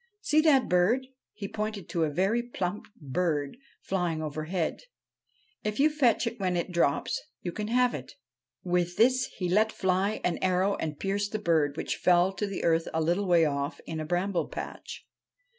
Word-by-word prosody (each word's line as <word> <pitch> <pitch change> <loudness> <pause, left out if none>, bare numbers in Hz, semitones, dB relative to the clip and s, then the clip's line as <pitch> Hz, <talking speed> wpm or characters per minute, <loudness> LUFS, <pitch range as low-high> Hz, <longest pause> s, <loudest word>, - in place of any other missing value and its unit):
See 310 -7 +3
that 290 -5 +4
bird? 190 +9 +3
' - - -64
He 205 -2 -6
pointed 210 -3 -4
to 165 -2 +1
a - - -1
very 195 +10 +1
plump 205 -5 -4
bird 145 -1 -1 0.3
flying 175 -4 -1
overhead. 155 +3 -3 0.4
' 430 - -40
If 210 +2 -2
you 305 +2 +5
fetch 255 -6 +2
it 230 0 -4
when 185 -2 0
it 175 +2 -2
drops, 155 -5 +1 0.2
you 175 - -2
can 210 +4 -4
have 250 +2 +3
it.' 130 -3 -7 0.5
With 175 -1 0
this 255 +2 +4
he 180 - -1
let 215 +5 +3
fly 190 +2 0
an 175 - 0
arrow 185 +2 +2
and 155 -2 -4
pierced 205 +2 -1
the - - +1
bird, 160 -7 +1
which - - -2
fell 180 +1 +4
to 195 -1 -3
earth 165 0 +2
a - - +2
little 175 +5 +1
way 170 -2 +5
off 140 0 -2
in 160 - -4
a 155 - -3
bramble 180 +3 0
patch. - - -7
185 Hz, 185 wpm, -28 LUFS, 165-215 Hz, 0.5 s, you